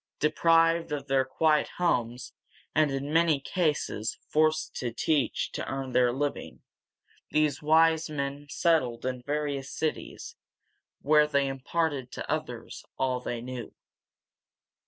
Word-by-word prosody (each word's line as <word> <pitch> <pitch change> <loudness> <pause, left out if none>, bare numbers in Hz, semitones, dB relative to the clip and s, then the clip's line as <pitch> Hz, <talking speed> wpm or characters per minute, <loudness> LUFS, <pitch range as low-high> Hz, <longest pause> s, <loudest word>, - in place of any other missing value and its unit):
Deprived 165 +1 +3
of 145 -2 -3
their 135 -1 +3
quiet 150 +3 +2
homes, 125 -8 -1 0.4
and 155 -1 +3
in 140 +2 -3
many 165 -3 +4
cases 145 - -1
forced 155 0 +1
to 120 -2 -3
teach 140 +4 0
to - - -4
earn 135 -1 -4
their 125 -1 +3
living, 145 +3 -4 0.7
these 150 -2 +1
wise 160 +1 +4
men 140 -1 -4
settled 135 -9 +1
in 130 -1 -2
various 145 0 -2
cities, 155 -1 -4 0.7
where 150 +1 +5
they 140 -2 +2
imparted 135 0 -2
to - - -6
others - - -4
all 130 -1 0
they 120 -1 -4
knew. 125 -1 -7
145 Hz, 125 wpm, -28 LUFS, 130-155 Hz, 0.7 s, where